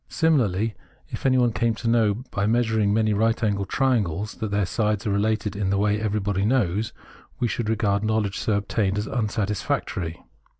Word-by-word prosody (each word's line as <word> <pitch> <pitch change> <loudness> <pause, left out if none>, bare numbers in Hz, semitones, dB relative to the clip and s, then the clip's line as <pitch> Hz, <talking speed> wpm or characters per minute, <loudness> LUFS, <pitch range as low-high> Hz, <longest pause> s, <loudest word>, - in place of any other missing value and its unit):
Simi 160 -2 +3
larly, 110 0 0 0.4
if - - -2
anyone 125 -2 +3
came 115 0 0
to 115 - -5
know 115 -1 +2
by 100 0 0
measuring 110 -3 +2
many 110 0 +2
right 115 +3 +1
angled 100 -3 0
triangles 105 - 0
that 110 -2 -4
their 100 0 +1
sides 105 +2 -1
are 105 - 0
related 105 0 0
in 100 -1 -1
the 100 - +1
way 105 +1 +1
everybody 100 -2 0
knows, 110 -2 +1 0.5
v/e 120 - +1
should 115 -1 -2
regard 105 -2 +1
knowledge 110 -2 0
so 110 - 0
obtained 100 0 0
as 105 - -1
unsatisfactory. 105 - -2
105 Hz, 175 wpm, -24 LUFS, 100-115 Hz, 0.5 s, Simi